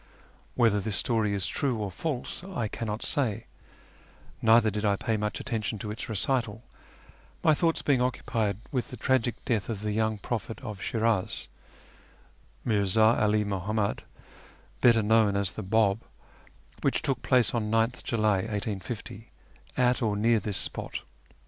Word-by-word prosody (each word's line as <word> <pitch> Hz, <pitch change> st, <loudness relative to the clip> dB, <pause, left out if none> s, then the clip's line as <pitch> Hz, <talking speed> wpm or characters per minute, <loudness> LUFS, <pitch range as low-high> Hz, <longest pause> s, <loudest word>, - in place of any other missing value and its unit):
Whether 115 Hz, -4 st, +4 dB
this 105 Hz, 0 st, -2 dB
story 110 Hz, -4 st, +1 dB
is 100 Hz, -, -1 dB
true 135 Hz, -4 st, 0 dB
or 105 Hz, -3 st, -3 dB
false 145 Hz, -, -4 dB
I 180 Hz, -, -3 dB
cannot 110 Hz, 0 st, -4 dB
say, 115 Hz, -5 st, 0 dB, 1.0 s
neither 110 Hz, -1 st, +5 dB
did 105 Hz, +1 st, -3 dB
I 100 Hz, -2 st, +3 dB
pay 110 Hz, +3 st, -1 dB
much 105 Hz, 0 st, -2 dB
attention 110 Hz, -4 st, -2 dB
to 105 Hz, +1 st, -5 dB
its 110 Hz, -, -6 dB
recital, 115 Hz, +1 st, 0 dB, 0.8 s
my 155 Hz, -, +6 dB
thoughts 165 Hz, +2 st, +1 dB
being 135 Hz, -4 st, +3 dB
occupied 115 Hz, -5 st, -1 dB
with 125 Hz, -5 st, -2 dB
the 125 Hz, -, -8 dB
tragic 125 Hz, 0 st, +1 dB
death 110 Hz, -3 st, 0 dB
of 105 Hz, -3 st, -3 dB
the 105 Hz, 0 st, -2 dB
young 110 Hz, 0 st, 0 dB
prophet 110 Hz, +1 st, -4 dB
of 105 Hz, -6 st, -7 dB
Shiraz, 110 Hz, -4 st, 0 dB, 1.2 s
Mirza 110 Hz, +2 st, +4 dB
'Ali 105 Hz, 0 st, +3 dB
Muhammad, 100 Hz, +1 st, -1 dB, 0.8 s
better 115 Hz, -2 st, +5 dB
known 110 Hz, -1 st, +4 dB
as 100 Hz, -2 st, 0 dB
the -, -, -6 dB
Bab, 105 Hz, +1 st, +2 dB, 0.8 s
which -, -, +1 dB
took 130 Hz, -3 st, -1 dB
place 125 Hz, -4 st, +3 dB
on 110 Hz, -3 st, -1 dB
9th 115 Hz, +3 st, +1 dB
July 105 Hz, -4 st, +2 dB
1850, 105 Hz, +1 st, -4 dB, 0.5 s
at 125 Hz, -1 st, +3 dB
or 110 Hz, -3 st, +1 dB
near 115 Hz, +2 st, +3 dB
this 105 Hz, -1 st, -3 dB
spot. -, -, -4 dB
110 Hz, 150 wpm, -28 LUFS, 105-120 Hz, 1.2 s, my